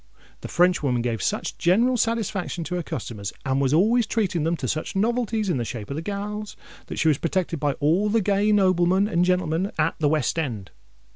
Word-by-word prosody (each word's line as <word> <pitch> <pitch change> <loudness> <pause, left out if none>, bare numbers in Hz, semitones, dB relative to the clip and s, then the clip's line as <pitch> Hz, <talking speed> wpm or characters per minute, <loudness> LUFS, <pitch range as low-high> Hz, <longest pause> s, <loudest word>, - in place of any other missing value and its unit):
The - - -7
Frenchwoman 155 -9 +2
gave 115 -4 -2
such - - -2
general 230 +9 +3
satisfaction 215 -7 -1
to 180 - -6
her 180 - -1
customers, 105 - -5
and 135 0 +1
was 135 -1 +1
always 215 +9 +3
treating 190 -8 0
them 165 +1 0
to 130 - -4
such 155 +8 -3
novelties 225 0 0
in 175 - 0
the 120 - -1
shape 115 -1 -6
of 155 +4 -4
gals, 205 +2 -5 0.3
that - - -6
she 160 - +1
was 150 -3 +3
protected 170 -2 -1
by 145 -1 +1
all 170 +10 +1
the 225 +2 +3
gay 205 +1 +2
noblemen 185 -1 +3
and 175 -3 +1
gentlemen 180 +1 0
at 160 +1 +2
the 150 -2 +2
West 155 +1 0
End. 110 - -4
175 Hz, 200 wpm, -24 LUFS, 150-205 Hz, 0.3 s, general